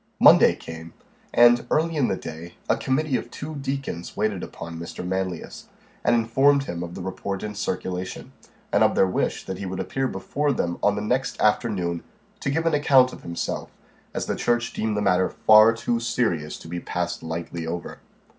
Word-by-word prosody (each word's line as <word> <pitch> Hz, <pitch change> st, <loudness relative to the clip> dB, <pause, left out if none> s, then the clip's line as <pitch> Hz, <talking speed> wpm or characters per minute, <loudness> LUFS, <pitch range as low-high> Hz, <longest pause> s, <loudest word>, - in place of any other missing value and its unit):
Monday -, -, +7 dB
came, 80 Hz, 0 st, -9 dB, 0.4 s
and, 120 Hz, 0 st, +6 dB
early 165 Hz, +1 st, +1 dB
in 145 Hz, -5 st, +2 dB
the -, -, 0 dB
day, 85 Hz, +2 st, -8 dB
a -, -, +3 dB
committee 135 Hz, 0 st, 0 dB
of -, -, -7 dB
two 155 Hz, +2 st, -7 dB
deacons 135 Hz, -, -4 dB
waited 105 Hz, -3 st, 0 dB
upon 85 Hz, 0 st, -7 dB
Mr. 85 Hz, +1 st, -6 dB
Manlius, 95 Hz, -2 st, -4 dB, 0.4 s
and -, -, +4 dB
informed 135 Hz, +5 st, +3 dB
him 85 Hz, -9 st, -5 dB
of 85 Hz, 0 st, -6 dB
the 90 Hz, -, -6 dB
report 95 Hz, +1 st, -4 dB
in 105 Hz, -1 st, -4 dB
circulation, 95 Hz, -2 st, -4 dB, 0.4 s
and -, -, +5 dB
of -, -, +3 dB
their -, -, +5 dB
wish 95 Hz, -, -1 dB
that 95 Hz, -1 st, -5 dB
he 100 Hz, -, -4 dB
would 95 Hz, 0 st, -4 dB
appear 135 Hz, +7 st, -1 dB
before 140 Hz, +8 st, -1 dB
them 85 Hz, -7 st, -2 dB
on 105 Hz, -, +3 dB
the 105 Hz, -, -3 dB
next 125 Hz, +4 st, -1 dB
afternoon, 100 Hz, -6 st, +1 dB, 0.4 s
to -, -, -2 dB
give 160 Hz, +4 st, 0 dB
an 165 Hz, -, +2 dB
account 135 Hz, -3 st, +5 dB
of -, -, -10 dB
himself, 85 Hz, 0 st, -4 dB, 0.4 s
as -, -, -3 dB
the -, -, -1 dB
church 120 Hz, -1 st, 0 dB
deemed 110 Hz, -1 st, -1 dB
the 105 Hz, -, 0 dB
matter 90 Hz, -1 st, +3 dB
far 110 Hz, +1 st, +6 dB
too 115 Hz, +1 st, -1 dB
serious 110 Hz, -10 st, -1 dB
to -, -, -12 dB
be 85 Hz, +1 st, -4 dB
passed -, -, -3 dB
lightly 80 Hz, 0 st, -5 dB
over. 85 Hz, +1 st, -5 dB
105 Hz, 190 wpm, -24 LUFS, 90-125 Hz, 0.4 s, Monday